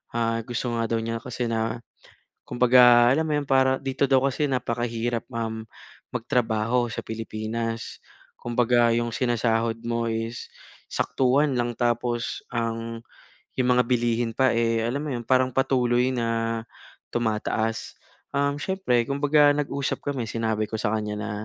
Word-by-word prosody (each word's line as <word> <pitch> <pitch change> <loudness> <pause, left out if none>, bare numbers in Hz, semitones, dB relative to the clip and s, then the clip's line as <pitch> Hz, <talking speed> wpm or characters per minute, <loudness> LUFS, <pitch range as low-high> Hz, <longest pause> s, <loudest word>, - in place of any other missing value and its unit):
ah, 115 0 0
gusto 120 0 -3
nga 115 - 0
daw 115 - +1
niya 115 0 -3
kasi 125 -1 -3
na 115 +1 -1 0.7
kumbaga 120 -1 +6
alam 160 +3 +1
mo - - -2
iyon 145 -1 -3
para 130 0 +3
dito 135 0 -2
daw 135 -1 +4
kasi 140 +3 0
napakahirap, 120 -2 -1
um, 110 -1 -3 0.5
magtrabaho 120 -1 0
sa - - -4
Pilipinas. 115 +1 -4 0.4
Kumbaga 120 0 +2
yung 120 -1 -1
sinasahod 115 -2 0
mo 115 0 0
is 115 +1 -4 0.4
saktuhan 135 +2 +1
lang 120 -1 0
tapos 120 0 -1
ang 115 0 -3 0.6
yung 125 -1 +2
mga 125 - +4
bilihin 120 -1 +1
pa, 130 +1 +3
eh 115 -1 +2
alam 125 +5 -1
mo - - -4
iyon, 120 - -4
parang 130 0 +3
patuloy 125 -2 +2
na 115 -1 -1 0.5
tumataas. 110 -1 -1 0.4
Um, 140 0 +1
siyempre 145 -9 0
kumbaga 145 +1 +4
nag-usap 140 -1 -2
kami 135 -4 -2
sinabi 110 -1 -1
ko 110 - -2
sa 110 -1 0
kanya 105 -1 -3
na, 105 0 -4
120 Hz, 145 wpm, -25 LUFS, 115-130 Hz, 0.7 s, kumbaga